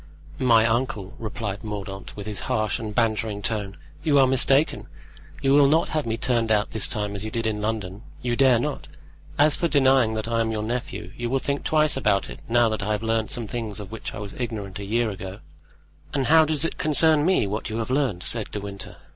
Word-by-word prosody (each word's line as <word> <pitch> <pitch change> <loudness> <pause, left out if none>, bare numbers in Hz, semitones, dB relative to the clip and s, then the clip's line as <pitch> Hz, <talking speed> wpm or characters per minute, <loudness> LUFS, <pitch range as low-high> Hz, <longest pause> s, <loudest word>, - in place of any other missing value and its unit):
"My 115 -3 +5
uncle," 115 -4 -1
replied 110 -1 -5
Mordaunt, 100 -2 -6
with 100 - -6
his 105 -2 -5
harsh 110 0 0
and 110 -2 -6
bantering 110 -3 0
tone, 100 -3 -3 0.2
"you 150 -2 +3
are 135 - +7
mistaken; 135 +3 +3 0.6
you 135 0 +4
will 145 -1 +6
not 160 +4 +2
have 155 -5 -1
me 115 0 -1
turned 115 -2 0
out 105 -1 +2
this 110 - +2
time 105 -2 -2
as 100 0 -4
you 110 - -3
did 115 +1 -3
in 105 -1 -1
London—you 110 +3 -4
dare 130 -1 +5
not. 145 +5 -3 0.5
As 150 +1 +4
for 170 - 0
denying 130 -6 +3
that 110 0 -3
I 115 -1 +1
am 110 0 0
your 110 -1 -2
nephew, 120 +3 -4
you 120 0 -3
will 135 - +1
think 140 +1 -2
twice 155 -1 +3
about 105 -7 +1
it, - - -9
now 120 0 +4
that 110 0 -3
I 105 +2 0
have 105 - -3
learned 110 -1 0
some 120 - -2
things 110 -3 -5
of 100 -1 -9
which 115 - -6
I - - -6
was 105 -1 -7
ignorant 105 -5 -4
a 100 - -6
year 115 +2 0
ago." 95 0 -7 0.8
"And 135 -2 +1
how 160 +1 +6
does 155 0 0
it - - -4
concern 155 0 +4
me 185 - +3
what 105 +3 -3
you 110 - -3
have 115 +2 -3
learned?" 130 -10 0
said 115 -3 0
De 105 - -4
Winter. 100 -1 -8
115 Hz, 220 wpm, -24 LUFS, 105-130 Hz, 0.8 s, are